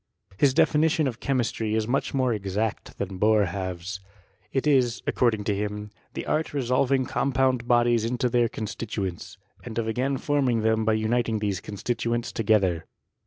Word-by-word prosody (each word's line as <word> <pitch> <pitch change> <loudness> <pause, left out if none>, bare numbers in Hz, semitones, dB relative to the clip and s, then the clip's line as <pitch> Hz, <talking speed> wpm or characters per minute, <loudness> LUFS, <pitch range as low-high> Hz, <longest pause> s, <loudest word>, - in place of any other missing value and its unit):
His 135 -2 +4
definitioQ 155 +1 +3
of 120 -4 -4
chemistry 115 -5 -1
ia 110 -1 0
much 135 +3 0
more 130 -3 +1
exact 105 +1 -3
than 95 -1 -4
Boerhaave's. 95 -3 0 0.5
It 135 - 0
is, 125 -7 +2
according 110 -4 +1
to 105 -1 0
him, 105 +1 -4 0.2
the - - -4
art 155 +1 0
of - - -14
resolving 130 0 +2
compound 130 -2 +1
bodies 120 -2 +3
into 125 +2 0
their 120 -1 +2
constituents, 105 -4 -5 0.3
and 115 -2 -7
of 115 -1 0
again 130 +5 0
forming 130 -5 +1
them 110 0 +2
by 110 - +3
uniting 110 +1 +1
these 100 -3 -1
constituents 115 +3 -2
together. 100 -7 +1
115 Hz, 155 wpm, -26 LUFS, 105-125 Hz, 0.5 s, His